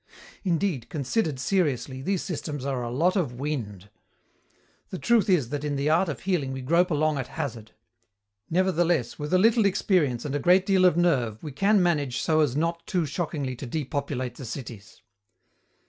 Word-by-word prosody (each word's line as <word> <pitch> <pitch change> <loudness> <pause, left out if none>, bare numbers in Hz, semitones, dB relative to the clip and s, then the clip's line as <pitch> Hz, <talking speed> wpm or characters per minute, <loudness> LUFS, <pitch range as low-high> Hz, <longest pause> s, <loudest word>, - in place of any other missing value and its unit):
Indeed, 175 - -1
considered 150 - -1
seriously, 130 -5 0
these 190 +5 -1
systems 145 -5 -5
are 135 -3 -1
a 120 - -3
lot 165 +10 +1
of 160 -11 0
wind. 105 -9 -4 1.0
The 185 - -5
truth 230 +1 +2
is 155 -11 +2
that 145 +1 -4
in 145 -1 -1
the 140 +2 +1
art 170 +3 +3
of 135 -7 -5
healing 165 -9 -1
we 130 - -5
grope 170 +7 +3
along 155 -2 +1
at 130 - -4
hazard. 115 -5 -6 0.8
Nevertheless, 175 -6 +1
with 150 0 -4
a 185 - +5
little 225 +4 +4
experience 155 - +1
and 140 - -3
a 145 - 0
great 180 +4 +4
deal 190 -2 +3
of 175 -2 +4
nerve 125 -11 +1
we 150 - -5
can 195 +7 +3
manage 145 -7 0
so 155 -1 +2
as 145 -5 +2
not 170 +2 -1
too 180 -4 0
shockingly 145 -4 -3
to 130 - -7
depopulate 135 -3 -3
the - - -8
cities. 115 -4 -9
150 Hz, 180 wpm, -26 LUFS, 130-180 Hz, 1.0 s, a